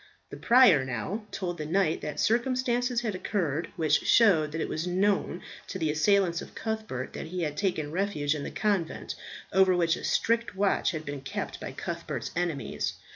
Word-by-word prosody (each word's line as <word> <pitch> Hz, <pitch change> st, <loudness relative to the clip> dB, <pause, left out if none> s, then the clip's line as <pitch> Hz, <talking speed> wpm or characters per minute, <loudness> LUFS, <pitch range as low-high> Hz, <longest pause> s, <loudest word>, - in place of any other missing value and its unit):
The -, -, -6 dB
prior 235 Hz, -, +6 dB
now 160 Hz, -, -4 dB
told 175 Hz, -4 st, -4 dB
the 155 Hz, -, -3 dB
knight 170 Hz, -1 st, +1 dB
that 150 Hz, -1 st, -5 dB
circumstances 245 Hz, +1 st, +1 dB
had 220 Hz, -4 st, -2 dB
occurred, 175 Hz, -5 st, -2 dB
which 155 Hz, -3 st, +3 dB
showed 165 Hz, -10 st, +5 dB
that 160 Hz, -, -4 dB
it -, -, -1 dB
was 160 Hz, +3 st, -3 dB
known 190 Hz, -1 st, 0 dB, 0.2 s
to 190 Hz, -, -5 dB
the 160 Hz, -4 st, 0 dB
assailants 175 Hz, +2 st, +2 dB
of -, -, -11 dB
Cuthbert 215 Hz, -, -4 dB
that -, -, -6 dB
he 180 Hz, +1 st, -3 dB
had 150 Hz, -2 st, -2 dB
taken 155 Hz, -5 st, -1 dB
refuge 170 Hz, -5 st, 0 dB
in 150 Hz, -, -4 dB
the -, -, -4 dB
convent, 200 Hz, -6 st, -1 dB, 0.4 s
over 190 Hz, -1 st, +5 dB
which 170 Hz, -1 st, +2 dB
a -, -, -9 dB
strict 230 Hz, -3 st, +1 dB
watch 195 Hz, 0 st, +2 dB
had 155 Hz, -2 st, -4 dB
been 145 Hz, -1 st, -5 dB
kept 135 Hz, -, -5 dB
by -, -, -6 dB
Cuthbert's -, -, -5 dB
enemies. 170 Hz, -4 st, -2 dB
180 Hz, 180 wpm, -28 LUFS, 155-205 Hz, 0.4 s, prior